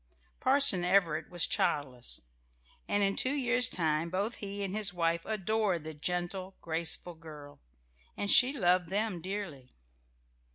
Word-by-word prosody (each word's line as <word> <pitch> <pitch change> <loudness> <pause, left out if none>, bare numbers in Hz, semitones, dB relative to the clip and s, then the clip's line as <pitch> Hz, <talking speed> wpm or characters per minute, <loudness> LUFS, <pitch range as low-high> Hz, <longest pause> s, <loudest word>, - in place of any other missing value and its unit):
Parson 265 -8 +4
Everett 180 -4 +1
was 175 -2 +2
childless, 130 -4 +1 0.7
and 205 0 +1
in 195 0 +1
two 260 - +1
years' 250 -2 +4
time 160 -1 -1
both 200 +6 -2
he 200 0 -5
and 195 0 -4
his 215 -3 0
wife 170 -1 -1
adored 210 -4 -1
the 160 0 -7
gentle, 180 +4 -4
graceful 165 +1 -2
girl; 150 -3 -13 0.6
and 200 - 0
she 250 +1 +7
loved 180 - +1
them 200 -2 -2
dearly. 175 -9 -7
180 Hz, 135 wpm, -30 LUFS, 165-205 Hz, 0.7 s, she